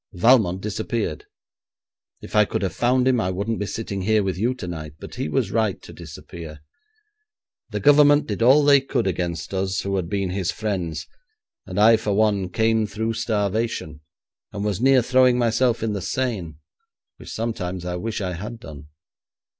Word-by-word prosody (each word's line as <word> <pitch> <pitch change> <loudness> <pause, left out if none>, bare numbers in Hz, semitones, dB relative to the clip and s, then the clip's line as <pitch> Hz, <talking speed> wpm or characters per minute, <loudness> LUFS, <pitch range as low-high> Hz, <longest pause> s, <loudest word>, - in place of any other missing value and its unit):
Valmont 95 -2 +4
disappeared. 105 -4 -3 1.0
If - - -8
I 105 - +6
could 100 - -3
have 95 - -1
found 125 +1 +2
him, 125 -3 +3
I 95 - -1
wouldn't 100 +5 -2
be 105 - -2
sitting 100 -3 -4
here 105 +2 +2
with 95 -2 -1
you 120 +7 0
tonight; 80 - -7
but - - -10
he - - -3
was 105 +1 0
right 110 -3 0
to - - -11
disappear. 80 -3 -10 1.1
The - - -4
Government 145 0 +6
did 105 +1 -4
all 135 +5 +6
they 140 -1 +6
could 130 -3 -1
against 85 -1 -3
us 95 0 -1
who 100 0 -2
had 85 -3 -3
been 100 -2 -1
his 95 0 -1
friends, 95 -7 -3 0.6
and - - -3
I 110 +2 +7
for 105 -2 -2
one 100 -3 +1
came 110 +2 +1
through 110 +3 -3
starvation, 105 -7 -2 0.5
and 100 0 -4
was 105 0 -1
near 130 -1 +5
throwing 130 0 +4
myself 120 0 +1
in 110 -2 -1
the 100 - -3
Seine, 100 - -3 0.6
which - - -11
sometimes 95 -6 -4
I 90 0 -3
wish 110 +4 -4
I 90 -2 -2
had 105 +7 -7
done. 75 -7 -11
105 Hz, 175 wpm, -23 LUFS, 95-115 Hz, 1.1 s, I